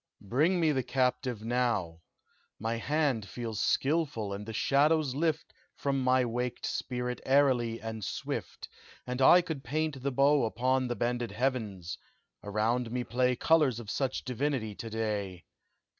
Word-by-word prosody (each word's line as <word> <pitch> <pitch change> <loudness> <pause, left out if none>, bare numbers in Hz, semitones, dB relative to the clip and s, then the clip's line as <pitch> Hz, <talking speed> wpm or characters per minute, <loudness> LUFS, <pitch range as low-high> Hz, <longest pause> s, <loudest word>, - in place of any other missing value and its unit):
"Bring 160 +9 +3
me 160 -2 +3
the 135 -3 +1
captive 125 -3 -1
now! 115 -9 0 0.6
My 115 +2 -1
hand 135 -6 0
feels 115 -4 -5
skilful, 140 -9 0
and 105 +2 -6
the - - -4
shadows 145 +4 +2
lift 160 +2 -1 0.2
From 135 -1 -1
my 130 0 +3
waked 125 +1 -3
spirit 125 -1 -3
airily 130 -4 +3
and 110 -1 -6
swift, - - -5 0.4
And 125 +1 -3
I 175 +7 +8
could 160 -6 -5
paint 150 +1 -2
the 140 +2 -1
bow 140 0 +4
Upon 130 +3 +1
the 120 - -2
bended 120 +1 -1
heavens 105 -6 -2 0.4
around 110 +4 0
me 125 0 -1
play 125 +1 +1
Colors 145 -4 +3
of 110 -2 -6
such 135 -2 -1
divinity 125 -4 -1
to 115 +3 -7
day. 105 -5 -3
125 Hz, 145 wpm, -30 LUFS, 115-140 Hz, 0.6 s, I